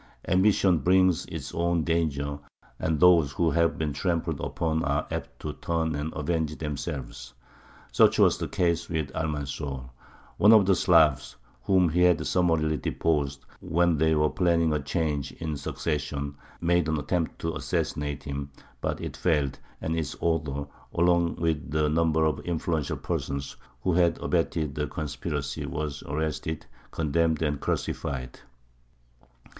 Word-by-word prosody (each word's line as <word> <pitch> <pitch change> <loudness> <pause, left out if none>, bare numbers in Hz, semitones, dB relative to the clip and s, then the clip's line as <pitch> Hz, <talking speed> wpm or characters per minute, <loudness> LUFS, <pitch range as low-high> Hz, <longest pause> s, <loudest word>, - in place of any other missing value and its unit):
Ambition 95 -2 +4
brings 90 +2 +3
its 70 -5 -6
own 85 -1 +1
dangers, 75 -4 -1 0.4
and 80 -2 0
those 85 -5 +5
who 85 +1 +1
have 85 +2 +2
been 75 -2 -1
trampled 85 -1 -1
upon 80 -1 -1
are 70 +3 0
apt - - -5
to - - -4
turn 80 -1 -1
and 75 +2 -3
avenge 80 0 -1
themselves. 65 -4 -5 0.6
Such - - +5
was - - +4
the - - -2
case 85 -1 0
with 80 -4 -2
Almanzor. 70 -4 -4 0.5
One 105 +3 +7
of 105 -3 +7
the 95 - +4
"Slavs," 80 -9 +3 0.3
whom 95 -3 +3
he 90 +3 +1
had 90 -2 +4
summarily 80 -4 +2
deposed 70 -5 -1
when 85 -1 +2
they 80 +1 +3
were 75 0 +2
planning 85 -3 +2
a 75 - +1
change 75 0 -2
in 80 -1 -5
the 75 - -3
succession, 70 -1 -3 0.3
made 85 -1 +2
an 80 0 0
attempt 80 +3 -1
to - - -1
assassinate 75 -1 -2
him; 70 0 -5 0.3
but - - -2
it - - -5
failed, 75 -6 0 0.2
and 80 +1 -1
its 80 -3 -2
author, 75 -4 -1 0.3
along 85 0 +3
with 80 -3 -2
a 75 -1 +2
number 80 0 +2
of 75 -3 0
influential 80 -3 -2
persons 70 0 -3 0.3
who 90 - +1
had 85 -1 +3
abetted 80 -3 -1
the 75 +1 -2
conspiracy, 75 -1 -4
was 75 -2 -4
arrested, 80 +1 -3 0.2
condemned, 80 0 +1
and 75 -2 0
crucified. 65 -3 -3
80 Hz, 145 wpm, -27 LUFS, 75-85 Hz, 0.6 s, One